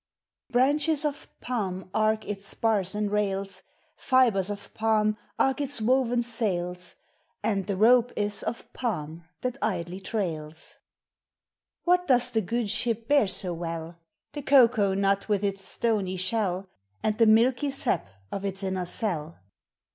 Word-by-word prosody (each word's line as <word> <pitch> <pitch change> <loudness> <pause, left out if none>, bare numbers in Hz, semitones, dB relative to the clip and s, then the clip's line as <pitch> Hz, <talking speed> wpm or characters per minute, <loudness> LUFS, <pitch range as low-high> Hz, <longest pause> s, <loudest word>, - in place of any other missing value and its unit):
Branches 290 +4 +2
of 290 -1 -3
palm 190 -7 -3
arc 215 0 +1
its 200 -1 -5
spars 205 -4 0
and 210 -1 -1
rails, 195 -2 -1 0.3
Fibres 235 -8 +3
of 200 -1 -7
palm 215 -1 +2 0.2
arc 270 +2 +2
its 285 -3 +1
woven 245 +1 +2 0.2
Bails, 180 -4 -2 0.5
And 200 -3 0
the 200 -2 -1
rope 240 +3 +5
is 205 0 0
of 235 - -5
palm 170 -9 -4 0.2
thai 250 - +1 0.3
Ldlj 180 +3 -9
trails! 160 -8 -4 1.0
What 360 0 +2
does 250 -2 +3
the 225 - +2
good 220 +2 -1
ship 230 0 0
bear 285 -6 +4 0.2
bo 180 -2 -2
well? 165 0 -5 0.3
The 290 - -5
cocoa 235 -8 +4
nul 195 0 +3
with 205 -2 0
its 195 -1 -1
stony 205 -4 -1
shell, 190 -1 +1 0.4
And 215 0 0
the 230 - +6
milky 245 +6 +4
sap 270 - -1 0.2
of 195 - -4
its 195 0 -1
inner 190 -2 -2
cell. 170 -6 -2
210 Hz, 140 wpm, -27 LUFS, 190-240 Hz, 1.0 s, the